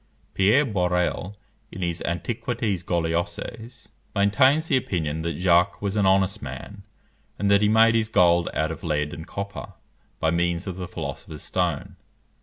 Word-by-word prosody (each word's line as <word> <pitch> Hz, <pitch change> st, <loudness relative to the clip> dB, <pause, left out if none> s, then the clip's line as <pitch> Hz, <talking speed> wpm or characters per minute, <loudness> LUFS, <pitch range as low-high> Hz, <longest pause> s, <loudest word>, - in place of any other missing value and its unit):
Pierre 110 Hz, +10 st, +4 dB
Borel, 90 Hz, -1 st, -1 dB, 0.3 s
in 95 Hz, -, -5 dB
his 85 Hz, -1 st, -2 dB
Antiquités 110 Hz, +1 st, -2 dB
Gauloises, 85 Hz, +8 st, -3 dB, 0.3 s
maintains 130 Hz, +10 st, +3 dB
the 140 Hz, -, +2 dB
opinion 80 Hz, -, -1 dB
that 85 Hz, +1 st, -3 dB
Jacques 90 Hz, +1 st, +3 dB
was 100 Hz, 0 st, -2 dB
an 100 Hz, -2 st, +3 dB
honest 95 Hz, +2 st, +2 dB
man, 105 Hz, -1 st, -8 dB, 0.6 s
and 100 Hz, 0 st, +1 dB
that 100 Hz, 0 st, +5 dB
he 105 Hz, -, +3 dB
made 115 Hz, +1 st, +5 dB
his 110 Hz, -1 st, +1 dB
gold 85 Hz, -4 st, +4 dB
out 80 Hz, +1 st, 0 dB
of 80 Hz, -, -7 dB
lead 75 Hz, -3 st, -1 dB
and 80 Hz, -, -8 dB
copper 100 Hz, 0 st, -6 dB, 0.5 s
by 80 Hz, -, +1 dB
means 85 Hz, +1 st, 0 dB
of 95 Hz, -2 st, -5 dB
the 90 Hz, -1 st, -5 dB
philosopher's 80 Hz, -3 st, -7 dB
stone. 90 Hz, -5 st, -2 dB
95 Hz, 155 wpm, -24 LUFS, 85-105 Hz, 0.6 s, that